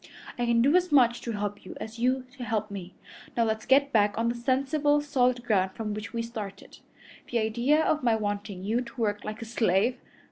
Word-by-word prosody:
I 240 Hz, -1 st, -1 dB
can 235 Hz, 0 st, +3 dB
do 285 Hz, +6 st, +4 dB
as 365 Hz, -2 st, +2 dB
much 245 Hz, -4 st, +4 dB
to 230 Hz, -, -4 dB
help 205 Hz, 0 st, -4 dB
you 185 Hz, -, -9 dB
as 220 Hz, +1 st, -7 dB
you 255 Hz, +2 st, +1 dB
to 255 Hz, -, -7 dB
help 215 Hz, -2 st, -2 dB
me. 185 Hz, -2 st, -7 dB, 0.4 s
Now 235 Hz, -, +4 dB
let's 220 Hz, -1 st, -2 dB
get 275 Hz, +1 st, +4 dB
back 205 Hz, -2 st, +3 dB
on 230 Hz, +1 st, +1 dB
the -, -, 0 dB
sensible, 275 Hz, +4 st, +1 dB
solid 255 Hz, -4 st, +1 dB
ground 190 Hz, -5 st, +1 dB
from 215 Hz, 0 st, -4 dB
which 210 Hz, -2 st, -6 dB
we 230 Hz, 0 st, -2 dB
started. 210 Hz, -4 st, -8 dB, 0.5 s
The 240 Hz, -, 0 dB
idea 240 Hz, +8 st, +2 dB
of 310 Hz, -, +1 dB
my 235 Hz, -3 st, +3 dB
wanting 205 Hz, -3 st, -3 dB
you 225 Hz, +5 st, 0 dB
to 240 Hz, 0 st, -10 dB
work 210 Hz, -2 st, 0 dB
like 215 Hz, +2 st, -5 dB
a -, -, -7 dB
slave! 225 Hz, +1 st, +1 dB
230 Hz, 215 wpm, -27 LUFS, 210-255 Hz, 0.5 s, do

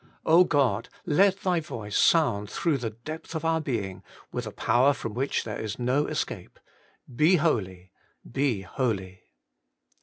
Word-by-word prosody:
God! 125 Hz, -8 st, +1 dB, 0.2 s
let 190 Hz, +4 st, +3 dB
Thy 180 Hz, -2 st, +1 dB
voice 115 Hz, -10 st, -6 dB
sound 105 Hz, -12 st, +3 dB
through 155 Hz, -5 st, 0 dB
the 120 Hz, -2 st, -2 dB
depth 155 Hz, +10 st, -8 dB
of 160 Hz, 0 st, -3 dB
our 160 Hz, 0 st, +2 dB
being, 100 Hz, -10 st, -3 dB, 0.3 s
with -, -, -4 dB
a -, -, -5 dB
power 130 Hz, +4 st, +3 dB
from 115 Hz, -5 st, -6 dB
which 130 Hz, +5 st, -1 dB
there 110 Hz, -2 st, -5 dB
is 110 Hz, -2 st, -4 dB
no 130 Hz, +4 st, +1 dB
escape: -, -, -4 dB, 0.6 s
Be 155 Hz, +8 st, +5 dB
holy, 95 Hz, -, -1 dB, 0.4 s
be 130 Hz, -5 st, 0 dB
holy. 95 Hz, -3 st, -3 dB
125 Hz, 145 wpm, -27 LUFS, 105-155 Hz, 0.6 s, Be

